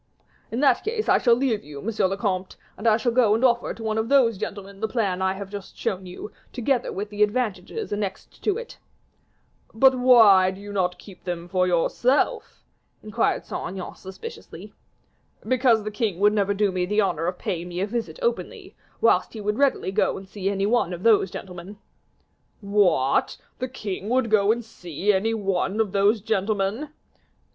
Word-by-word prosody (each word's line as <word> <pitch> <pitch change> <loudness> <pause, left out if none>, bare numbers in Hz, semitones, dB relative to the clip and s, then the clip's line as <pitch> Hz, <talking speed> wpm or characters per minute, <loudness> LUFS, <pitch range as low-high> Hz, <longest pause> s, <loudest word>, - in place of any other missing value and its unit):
"In 235 +4 -3
that 285 - +3
case 440 0 -2
I - - +4
shall 235 -2 +4
leave 240 -4 0
you, 145 -1 -9
monsieur 215 +2 0
le 195 +1 -3
comte, 190 -3 -2 0.2
and 210 - -3
I 220 -1 +5
shall 235 +1 0
go 230 -3 +4
and 235 +4 +2
offer 240 -1 +2
to 225 - -8
one 220 0 -1
of 225 +2 -2
those 260 -5 +4
gentlemen 200 -1 -6
the 220 - -1
plan 200 -6 -1
I 190 0 +1
have 195 0 -8
just 200 -2 -8
shown 190 -5 -3
you, 180 +4 -8 0.2
together 250 0 -1
with 205 +2 -5
the 210 0 -4
advantages 215 - -1
annexed 200 -2 -5
to 415 -1 +1
it." 480 0 -9 1.0
"But 265 +3 +6
why 225 -7 +6
do 190 +1 -7
you 205 0 -8
not 180 -2 0
keep 190 -4 -14
them 175 -1 -4
for 180 0 +1
yourself?" 240 - 0 0.4
inquired 215 -1 0
Saint - - -5
Aignan, 190 -2 -6
suspiciously. 445 - -10 0.7
"Because 245 -3 +3
the 215 - -4
king 210 -5 -2
would 210 +1 +4
never 200 -1 +1
do 205 -1 +1
me 180 -1 -1
the 210 +2 +1
honor 170 -4 -1
of 180 0 -2
paying 175 -5 -4
me 175 0 -5
a 195 - +1
visit 230 - -4
openly, 475 - -3 0.3
whilst - - +3
he 225 - -7
would 210 +3 -2
readily 275 -8 +2
go 210 - +1
and 190 - -10
see 195 0 -3
any 195 0 0
one 215 -5 +1
of 175 +1 -7
those 215 -4 +4
gentlemen." 180 +2 -9 0.8
"What! 200 -10 +2 0.2
the 255 - -3
king 205 -5 -5
would 250 -2 +1
go 210 -1 +4
and 235 0 -2
see 185 -1 -2
any 220 +4 0
one 195 0 -1
of 215 -3 +1
those 200 +2 +2
gentlemen?" 215 +5 -1
205 Hz, 190 wpm, -24 LUFS, 190-230 Hz, 1.0 s, But